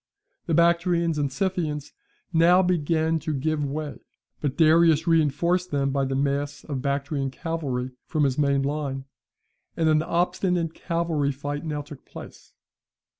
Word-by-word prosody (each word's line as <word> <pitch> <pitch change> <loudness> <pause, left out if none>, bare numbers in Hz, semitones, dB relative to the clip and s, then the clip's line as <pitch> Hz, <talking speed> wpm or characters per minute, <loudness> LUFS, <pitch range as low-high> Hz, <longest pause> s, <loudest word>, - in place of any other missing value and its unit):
The 165 - +1
Bactrians 170 -1 +2
and 140 -2 0
Scythians 155 -3 -2 0.4
now 175 +3 +5
began 165 -2 +1
to 155 0 -3
give 150 +2 -1
way, 145 +1 -4 0.4
but 145 -3 -2
Darius 160 -1 +5
reinforced 170 +3 +2
them 140 -2 0
by 135 0 0
the 135 0 -2
mass 140 +1 -1
of 140 -4 -4
Bactrian 140 0 -1
cavalry 135 -5 -3 0.2
from 155 -3 0
his 135 -2 +2
main 140 -1 +2
line, 140 -2 -3 0.7
and 160 - +2
an 155 -1 +4
obstinate 175 0 0
cavalry 165 -5 -1
fight 145 +2 -5
now 150 -2 -3
took 145 -1 -12
place. - - -12
155 Hz, 140 wpm, -25 LUFS, 140-170 Hz, 0.7 s, now